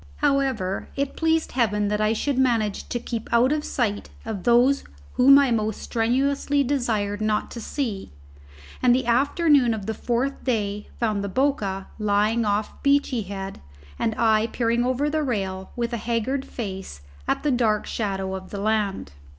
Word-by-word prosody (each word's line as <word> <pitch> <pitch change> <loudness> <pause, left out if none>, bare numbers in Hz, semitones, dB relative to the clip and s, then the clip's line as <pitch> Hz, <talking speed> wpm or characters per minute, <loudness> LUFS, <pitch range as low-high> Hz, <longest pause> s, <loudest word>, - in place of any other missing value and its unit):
However, 255 - 0
it 280 0 -2
pleased 320 0 +1
heaven 210 -4 +1
that 210 0 0
I 215 0 +3
should 265 +4 -1
manage 230 -6 +1
to - - -1
keep 230 -1 -5
out 240 +3 +4
of 300 0 0
sight 210 -8 -2 0.2
of 215 -5 -5
those 245 +4 +4 0.3
whom 275 +2 +7
I 280 -3 +4
most 220 -2 0
strenuously 275 +4 +1
desired 220 -7 -1
not 215 -1 0
to 235 - -6
see; 225 -5 -4 0.7
and 245 -1 +5
the 260 - 0
afternoon 275 0 +3
of 205 -3 -6
the 220 - -2
fourth 245 +5 -2
day 210 -4 -1
found 215 -4 0
the 200 - -3
Boca 200 -6 0
lying 210 +2 +2
off 205 +1 -1
Beachy 280 -4 +2
Head, 195 -1 -6 0.4
and 220 - 0
I 220 -1 +3
peering 235 0 0
over 255 +3 0
the 310 +1 0
rail, 195 -8 -2
with 235 0 -2
a - - 0
haggard 235 +4 -1
face, 190 - -6 0.3
at - - 0
the 295 - +2
dark 225 -4 +1
shadow 195 -3 -2
of 190 0 -6
the 200 - -5
land. 205 - -1
230 Hz, 165 wpm, -24 LUFS, 205-260 Hz, 0.7 s, whom